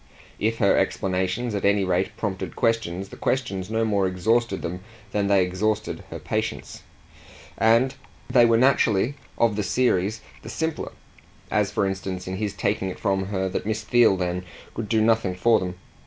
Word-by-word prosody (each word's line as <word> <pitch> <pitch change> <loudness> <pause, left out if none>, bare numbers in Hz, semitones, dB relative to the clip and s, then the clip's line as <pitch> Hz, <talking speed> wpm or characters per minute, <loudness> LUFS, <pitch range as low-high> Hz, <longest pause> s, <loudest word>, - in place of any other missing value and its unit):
If 115 +2 0
her 100 -3 +4
explanations 95 +5 0
at 100 - -2
any 100 0 +3
rate 95 0 0
prompted 95 -4 -4
questions 100 -6 0
the - - -10
questions 100 -8 -2
no 110 0 +1
more 100 -3 +2
exhausted 100 +3 0
them 90 +2 -4 0.3
than 100 -1 0
they 100 -2 +4
exhausted 105 +4 -2
her - - -6
patience. 110 +1 -4 0.7
And 115 +4 +3 0.3
they 125 -1 +5
were 115 -1 +5
naturally, 120 -2 +3 0.2
of 115 -3 +3
the 105 - 0
series, 110 -2 +1 0.2
the - - -9
simpler; 160 +7 -3 0.6
as - - +2
for - - 0
instance 95 -1 -4
in 95 0 -3
his 105 -1 -2
taking 100 -1 -1
it - - -6
from 95 -1 0
her 95 -1 -1
that 95 - -3
Miss 110 0 -1
Theale 115 -3 +4
then 90 0 -2 0.3
could 110 -2 -5
do 110 -1 +3
nothing 110 -4 +2
for 110 +4 +4
them. 90 -1 -4
105 Hz, 170 wpm, -24 LUFS, 95-115 Hz, 0.7 s, they